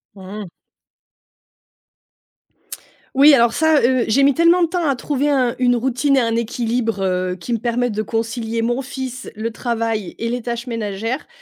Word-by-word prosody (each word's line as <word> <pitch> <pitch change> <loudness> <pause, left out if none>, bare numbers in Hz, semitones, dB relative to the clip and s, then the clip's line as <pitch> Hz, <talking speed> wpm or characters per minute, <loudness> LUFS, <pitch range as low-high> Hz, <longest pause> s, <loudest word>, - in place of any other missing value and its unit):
Mmh 195 +2 -8
mh. 190 - -10 2.7
Oui, 285 +2 +7
alors, 235 -2 +3
ça, 315 -1 +3
heu, 255 0 +2
j'ai 270 +6 +3
mis 280 0 +5
tellement 335 +4 +4
de - - +3
temps 345 -1 -1
à 275 - +2
trouver 285 +2 -1
un 255 -4 +2
une 245 -1 +3
routine 265 +3 +1
et - - +6
un 230 -2 0
équilibre, 230 -2 -1
heu, 185 -1 -1
qui 185 +7 -5
me 230 - 0
permettent 240 +1 -1
de 215 - -1
concilier 225 +1 -2
mon 240 +3 0
fils, 260 -1 -6
le 220 +2 -3
travail 225 -4 -3
et 230 - -3
les 245 +1 -2
tâches 235 0 -4
ménagères, 225 +2 -4
240 Hz, 175 wpm, -19 LUFS, 225-265 Hz, 2.7 s, Oui